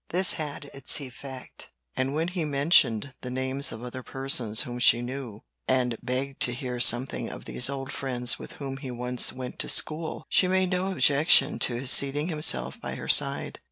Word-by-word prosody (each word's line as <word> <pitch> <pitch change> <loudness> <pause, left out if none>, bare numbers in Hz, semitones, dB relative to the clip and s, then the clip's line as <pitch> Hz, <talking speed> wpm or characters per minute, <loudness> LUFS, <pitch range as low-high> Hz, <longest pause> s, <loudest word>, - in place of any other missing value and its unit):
This 185 +2 +5
had 150 -2 -6
its 135 +2 +3
effect; 130 -1 -9 0.3
and 135 +2 -2
when 165 +3 -1
he 180 -2 -3
mentioned 140 -4 +2
the 125 - -6
names 130 +2 0
of 110 +1 -8
other 125 +1 -7
persons 125 -5 +1
whom 125 -4 -6
she 120 -1 +5
knew, 120 -3 -7 0.2
and 125 -2 +1
begged 135 +2 -4
to 120 - +2
hear 125 0 -5
something 120 +2 +2
of - - -10
these 125 - +2
old 135 0 -5
friends 125 -3 +1
with - - -10
whom 135 -2 -6
he 135 -1 -8
once 125 0 -1
went 130 -1 -8
to - - +1
school, 160 +1 -1
she 185 - +2
made 185 0 +1
no 185 +1 -1
objection 155 -3 +3
to 120 - +1
his 125 +2 0
seating 145 +4 +2
himself 155 -2 +1
by - - -5
her - - -8
side. - - +2
135 Hz, 190 wpm, -26 LUFS, 125-145 Hz, 0.3 s, This